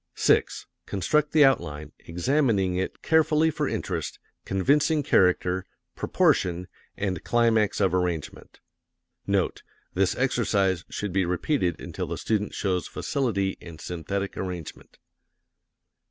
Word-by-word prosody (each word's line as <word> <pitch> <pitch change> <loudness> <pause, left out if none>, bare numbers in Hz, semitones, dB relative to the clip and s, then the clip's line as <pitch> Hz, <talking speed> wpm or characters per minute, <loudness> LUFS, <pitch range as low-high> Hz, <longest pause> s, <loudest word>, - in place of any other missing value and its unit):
6. - - +2 0.2
Construct 150 +10 +1
the 150 -2 +6
outline, 75 - 0
examining 100 - +1
it 95 +1 -3
carefully 160 0 +3
for 150 -2 -1
interest, 90 - -3 0.3
convincing 145 - +2
character, 90 -3 +2 0.3
proportion, 90 0 +1 0.3
and 95 -2 -2
climax 115 -3 +2
of 95 -3 +2
arrangement. 90 -4 -3 0.7
NOTE: - - 0 0.3
This 95 0 +1
exercise 100 -8 +1
should 105 -3 -4
be 95 0 +2
repeated 90 - 0
until - - -5
the - - -4
student 105 -2 -1
shows 95 -3 -1
facility 100 -8 -1
in 85 -2 -10
synthetic 95 +5 -4
arrangement. 90 -4 -6
95 Hz, 110 wpm, -26 LUFS, 90-125 Hz, 0.7 s, the